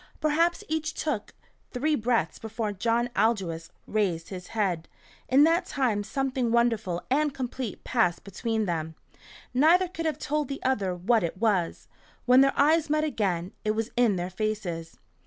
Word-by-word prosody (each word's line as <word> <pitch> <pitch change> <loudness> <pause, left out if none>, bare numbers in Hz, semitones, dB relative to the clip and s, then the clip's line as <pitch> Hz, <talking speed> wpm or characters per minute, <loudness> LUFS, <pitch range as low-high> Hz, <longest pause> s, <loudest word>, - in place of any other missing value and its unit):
Perhaps 330 +3 +2
each 315 0 -2
took 265 -10 -3 0.3
three 295 +5 0
breaths 230 - 0
before 220 -1 -3
John 235 +5 0
Aldous 190 -7 0 0.2
raised 185 -6 -1
his 180 -2 -7
head. 185 -7 -1 0.4
In 270 +3 +6
that 335 +3 +3
time 235 -7 0
something 260 0 -1
wonderful 225 -7 +1
and 295 +2 +2
complete 255 -3 -4
passed 220 -9 +1
between 220 +3 -2
them. 160 -3 -3 0.6
Neither 330 +8 +5
could 330 -2 -4
have 305 -3 -1
told 300 -1 -1
the 275 - -6
other 205 -9 0
what 220 +6 +2
it 170 +2 -3
was. 195 -5 0 0.4
When 250 +1 +7
their 275 0 +3
eyes 310 +2 +4
met 305 0 +2
again, 195 - -1
it 215 0 0
was 225 +1 -2
in 240 -5 +3
their 180 +1 -3
faces. 185 -5 -3
230 Hz, 155 wpm, -27 LUFS, 190-275 Hz, 0.6 s, When